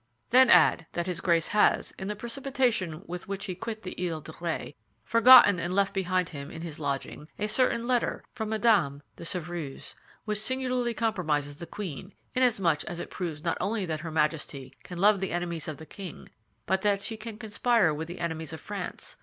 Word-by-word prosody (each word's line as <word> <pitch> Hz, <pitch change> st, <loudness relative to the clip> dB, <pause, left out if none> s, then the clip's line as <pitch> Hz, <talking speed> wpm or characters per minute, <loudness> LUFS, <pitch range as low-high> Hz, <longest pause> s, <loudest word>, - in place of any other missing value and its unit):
"Then 255 Hz, 0 st, +7 dB
add 165 Hz, -7 st, +5 dB
that 170 Hz, -, -1 dB
his 180 Hz, -2 st, -3 dB
Grace 170 Hz, -3 st, +2 dB
has, 210 Hz, -, +3 dB
in 190 Hz, -, -4 dB
the 210 Hz, -, -2 dB
precipitation 235 Hz, -, -1 dB
with 175 Hz, +1 st, -6 dB
which 200 Hz, 0 st, -4 dB
he 190 Hz, -, -3 dB
quit 220 Hz, +4 st, -6 dB
the 185 Hz, -, -5 dB, 0.2 s
Isle 165 Hz, -, -3 dB
of 160 Hz, -, -11 dB
Ré, 170 Hz, -3 st, -3 dB, 0.3 s
forgotten 230 Hz, -5 st, +8 dB
and 175 Hz, +2 st, -2 dB
left 200 Hz, 0 st, +2 dB
behind 185 Hz, -2 st, 0 dB
him 140 Hz, -4 st, -7 dB
in 165 Hz, -, -8 dB
his 160 Hz, -3 st, -6 dB
lodging 140 Hz, +1 st, -4 dB
a 210 Hz, -, -1 dB
certain 235 Hz, +1 st, +1 dB
letter 245 Hz, -1 st, 0 dB
from 220 Hz, -3 st, -4 dB
Madame 200 Hz, -11 st, +2 dB
de -, -, -9 dB
Chevreuse 165 Hz, -4 st, -5 dB, 0.3 s
which 210 Hz, -1 st, -1 dB
singularly 250 Hz, 0 st, -1 dB
compromises 155 Hz, -11 st, -1 dB
the 170 Hz, -, -7 dB
queen, 190 Hz, -1 st, -6 dB, 0.2 s
inasmuch 200 Hz, -12 st, +2 dB
as 175 Hz, 0 st, -5 dB
it -, -, -6 dB
proves 165 Hz, -4 st, -4 dB
not 170 Hz, -, -1 dB
only 210 Hz, -2 st, -1 dB
that 160 Hz, -3 st, -3 dB
her 165 Hz, +1 st, -6 dB
Majesty 150 Hz, -3 st, -1 dB
can 180 Hz, -, -9 dB
love 200 Hz, +2 st, +5 dB
the 190 Hz, -, -2 dB
enemies 170 Hz, -2 st, -3 dB
of 155 Hz, -2 st, -5 dB
the 160 Hz, -, -10 dB
king 185 Hz, +2 st, -9 dB, 0.4 s
but 190 Hz, 0 st, +1 dB
that 200 Hz, -1 st, +1 dB
she 225 Hz, -, -3 dB
can 220 Hz, 0 st, -8 dB
conspire 220 Hz, -4 st, +2 dB
with 160 Hz, +2 st, -4 dB
the 175 Hz, +1 st, -8 dB
enemies 160 Hz, -2 st, -3 dB
of 160 Hz, -, -6 dB
France. -, -, -6 dB
185 Hz, 195 wpm, -28 LUFS, 160-220 Hz, 0.4 s, forgotten